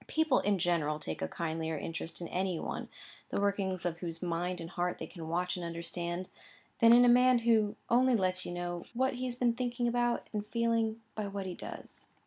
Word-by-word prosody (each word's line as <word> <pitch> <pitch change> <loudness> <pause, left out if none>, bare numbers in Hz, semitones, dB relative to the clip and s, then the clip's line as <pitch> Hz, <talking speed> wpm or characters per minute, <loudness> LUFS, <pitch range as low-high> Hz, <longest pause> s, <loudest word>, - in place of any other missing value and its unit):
People, 315 -4 +3
in 205 -1 +2
general, 165 -4 +1
take 80 - -5
a 80 - 0
kindlier 160 - -2
interest 165 +3 -5
in 170 - -4
any 185 -2 -1
one, - - -4 0.4
the - - -1
workings 195 -3 0
of 170 -1 -1
whose 165 -2 -5
mind 175 +1 -1
and 165 +1 -7
heart 180 0 -1
they - - -5
can 165 -3 -8
watch 180 +2 0
and 180 - -5
understand, 170 +1 -3 0.5
than 230 -2 +7
in 245 +1 +8
a - - +6
man 250 +1 +6
who 215 -3 +4
only 250 +1 +4
lets 185 -3 +1
you - - -5
know 175 0 -3
what 260 +2 +2
he 255 +1 -3
has 245 -1 -3
been 245 -1 +2
thinking 245 0 -1
about 240 0 +1
and 210 0 -3
feeling, 230 0 +1
by 215 -2 -3
what 200 -1 -4
he 185 - -3
does. - - -9
190 Hz, 210 wpm, -32 LUFS, 170-235 Hz, 0.5 s, in